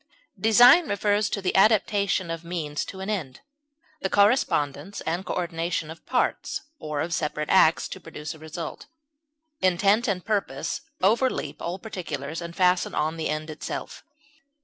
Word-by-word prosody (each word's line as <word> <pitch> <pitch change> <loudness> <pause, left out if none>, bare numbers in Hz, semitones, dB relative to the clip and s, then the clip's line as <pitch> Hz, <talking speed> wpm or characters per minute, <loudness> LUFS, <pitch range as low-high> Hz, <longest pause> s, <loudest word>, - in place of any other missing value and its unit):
Design 245 - +7
refers 205 +1 +1
to 200 - -3
the 185 - 0
adaptation 200 -3 +3
of 165 0 -5
means 160 -4 -3
to 190 - -8
an 190 - -4
end, 155 -11 -4 0.6
the 190 - -1
correspondence 200 - +2
and 170 +3 -2
coordination 170 -3 -2
of 165 - -13
parts, - - 0 0.2
or 150 -2 -3
of 165 +1 -2
separate 150 -1 -2
acts, 170 -4 +5
to - - -7
produce 155 0 -7
a 160 - -14
result; 160 +1 -7 0.7
intent 195 +5 +3
and 185 -4 -1
purpose 170 -7 -2 0.2
overleap 235 +7 +1
all 175 +2 -3
particulars, 165 -7 -5
and 170 0 -7
fasten 180 -1 +2
on 155 +2 0
the 160 -1 -3
end 155 +1 -3
itself. 155 - -6
175 Hz, 150 wpm, -25 LUFS, 160-200 Hz, 0.7 s, Design